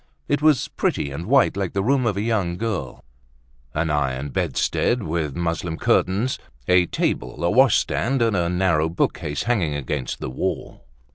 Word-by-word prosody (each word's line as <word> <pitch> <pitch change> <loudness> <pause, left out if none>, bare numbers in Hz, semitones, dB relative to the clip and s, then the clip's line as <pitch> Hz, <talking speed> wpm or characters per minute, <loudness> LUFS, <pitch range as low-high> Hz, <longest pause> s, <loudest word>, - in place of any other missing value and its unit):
It 145 - +1
was 150 -4 +3
pretty 70 - -1
and 80 +6 -6
white 135 -3 +4
like 95 -3 -2
the 95 - 0
room 130 +1 +2
of 100 -3 0
a - - 0
young 100 -7 0
girl; 100 - -4 0.7
an 80 0 0
iron 70 -1 -1
bedstead 120 - 0
with 80 -4 -2
muslin 85 -1 -2
curtains, 105 +8 +1 0.3
a 90 -1 +4
table, 65 +1 -2
a 85 - +2
washstand, 130 +1 +3
and 115 -3 +2
a 85 -2 +1
narrow 90 -3 +2
bookcase 75 -3 -1
hanging 100 -11 0
against 70 -1 -3
the 65 - -5
wall. 65 - -4
90 Hz, 160 wpm, -23 LUFS, 75-115 Hz, 0.7 s, white